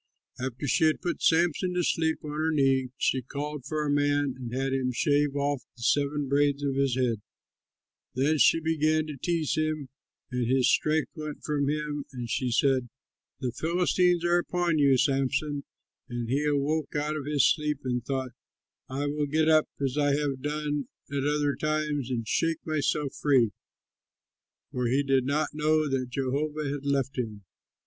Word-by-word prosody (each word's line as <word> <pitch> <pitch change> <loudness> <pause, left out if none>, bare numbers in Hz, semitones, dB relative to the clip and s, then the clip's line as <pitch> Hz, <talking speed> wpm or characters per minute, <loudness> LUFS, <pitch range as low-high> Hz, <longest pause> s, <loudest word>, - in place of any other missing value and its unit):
After 130 +2 -4
she 160 - +3
had 155 - +2
put 175 -2 -3
Samson 175 +2 +2
to 180 - +1
sleep 160 -1 0
on 150 - -4
her 155 +2 0
knees, 135 -4 +2
she 130 - +1
called 145 +2 -5
for 150 +1 -2
a 145 - 0
man 145 -1 +2
and 125 -3 -7
had 135 +1 -1
him 130 -1 0
shave 145 +3 +1
off 140 -1 0 0.2
the 120 - -9
seven 145 +2 +1
braids 145 +1 +2
on 140 - 0
his 135 -2 +1
head. 120 -4 0 0.9
Then 145 +4 +2
she 165 - +5
began 155 -1 +1
to 150 -2 -6
tease 165 +1 0
him, 155 -3 -1 0.4
and 125 -2 -1
his 130 -1 +3
strength 155 0 +1
went 155 -2 -6
from 145 -2 0
him; 150 -1 -2
and 125 -3 -5
she 125 +3 -1
said, 130 0 +2 0.5
"The 125 -2 -1
Philistines 175 +3 +1
are 175 0 +4
upon 175 -2 0
you, 140 -2 +5
Samson!" 140 +2 0 0.4
And 120 -1 -3
he 140 +5 0
awoke 150 +2 0
out 150 +1 -1
of 145 -2 -5
his 145 -3 +3
sleep 150 -3 0
and 125 -2 -1
thought, 130 -1 -3 0.6
"I 135 +2 -2
will 145 0 -1
get 155 +2 +2
up 155 -1 +4
as 140 +1 -1
I 145 -1 +3
have 140 -3 -2
done 150 -1 -2 0.2
at 140 -1 -1
other 145 -1 +1
times 150 -3 -1
and 115 -3 -2
shake 165 +4 0
myself 150 -2 0
free"; 130 -7 +4 1.2
for 125 -1 -1
he 135 +4 +2
did 135 -2 +2
not 145 +1 +1
know 155 0 +2
that 130 -2 -1
Jehovah 145 +4 -2
had 140 0 -5
left 135 -1 0
him. 110 -4 -4
145 Hz, 175 wpm, -28 LUFS, 135-155 Hz, 1.2 s, she